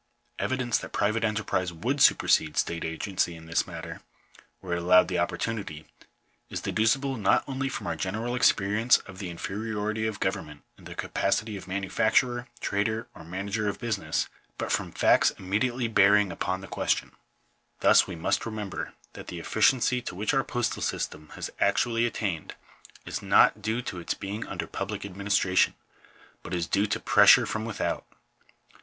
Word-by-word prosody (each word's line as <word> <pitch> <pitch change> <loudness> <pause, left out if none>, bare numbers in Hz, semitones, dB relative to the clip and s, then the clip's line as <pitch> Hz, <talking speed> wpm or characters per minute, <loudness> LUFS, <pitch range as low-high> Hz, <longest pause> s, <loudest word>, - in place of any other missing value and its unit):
Evidence 130 -2 0
that - - -8
private 110 +2 0
enterprise 100 -4 0
would 125 - -2
supersede 75 -1 +4
state 85 -1 0
agency 85 +1 -2
in 80 0 -12
this 80 0 0
matter, - - -8 0.6
were 90 -2 -5
it 85 - 0
allowed 90 +1 +5
the - - -1
opportunity, 100 -9 -3 0.6
is - - -4
deducible 135 +4 +1
not 100 -3 +3
only 135 0 -2
from 130 - -5
our - - -2
general 110 +6 -3
experience 115 -1 +4
of 95 -2 -11
the 95 -3 -5
infe 85 +3 -5
riority 110 0 -2
of 105 - -7
government 75 -1 -3
in - - -18
the - - -8
capacity 105 +2 -1
of 95 - -9
manufacturer, 110 +6 +1
trader, 110 +4 -1
or - - -12
manager 100 +5 -2
of 100 - -4
business, 110 -4 -1 0.3
but - - -3
from - - -1
facts - - +4
immediately 120 +6 -1
bearing 105 -2 +4
upon 95 +2 -2
the 95 - -9
question. - - -1 0.7
Thus - - +6
we 90 - -6
must 80 - 0
remember 105 -4 -5 0.2
that - - -10
the 90 - -6
efficiency 125 +6 +2
to 120 - -6
which 105 +8 -1
our 135 -1 +2
postal 120 -2 -2
system 75 0 -3
has - - -5
actually 120 -1 +2
attained 95 -9 -3 0.5
is - - -4
not 105 - +4
due 110 +4 -1
to 90 - -5
its 85 - -3
being 100 +2 -5
under - - -4
public - - -5
administration, 100 -1 +1 0.7
but 90 - -5
is 85 -1 -1
due 100 +5 +1
to 100 - -1
pressure - - +6
from 110 0 -3
without. 115 - -2
105 Hz, 165 wpm, -27 LUFS, 95-115 Hz, 0.7 s, Thus